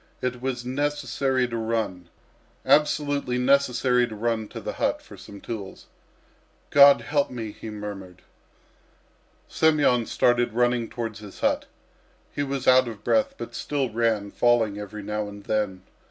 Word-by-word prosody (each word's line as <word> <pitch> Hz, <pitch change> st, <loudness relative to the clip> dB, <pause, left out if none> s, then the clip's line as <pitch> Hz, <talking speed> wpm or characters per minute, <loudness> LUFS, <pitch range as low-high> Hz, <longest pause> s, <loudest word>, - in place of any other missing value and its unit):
It 125 Hz, -1 st, -3 dB
was 125 Hz, -2 st, -3 dB
necessary 135 Hz, -1 st, -1 dB
to 120 Hz, -, -5 dB
run, 110 Hz, -6 st, -2 dB, 0.6 s
absolutely 145 Hz, -4 st, +2 dB
necessary 125 Hz, -2 st, +2 dB
to 110 Hz, -, -8 dB
run 110 Hz, 0 st, -1 dB
to -, -, -8 dB
the -, -, -5 dB
hut -, -, 0 dB
for -, -, -14 dB
some 100 Hz, -, -12 dB
tools. 100 Hz, -4 st, -7 dB, 0.9 s
"God 140 Hz, 0 st, +8 dB
help 145 Hz, -1 st, 0 dB
me!" 115 Hz, -4 st, -6 dB
he 110 Hz, -, -9 dB
murmured. 100 Hz, -4 st, -8 dB, 1.2 s
Semyon 145 Hz, -7 st, +2 dB
started 120 Hz, -1 st, +2 dB
running 120 Hz, -1 st, +1 dB
towards 115 Hz, -3 st, -5 dB
his 105 Hz, -2 st, -12 dB
hut. -, -, +1 dB, 0.7 s
He -, -, -2 dB
was 140 Hz, -2 st, -3 dB
out 130 Hz, 0 st, +6 dB
of 110 Hz, -3 st, -8 dB
breath, 275 Hz, 0 st, +1 dB
but -, -, -7 dB
still 140 Hz, -5 st, -2 dB
ran, 110 Hz, -3 st, 0 dB
falling 115 Hz, -4 st, +2 dB
every 105 Hz, 0 st, -7 dB
now 105 Hz, +1 st, -3 dB
and 100 Hz, 0 st, -11 dB
then. 100 Hz, -3 st, -2 dB
120 Hz, 145 wpm, -25 LUFS, 105-130 Hz, 1.2 s, God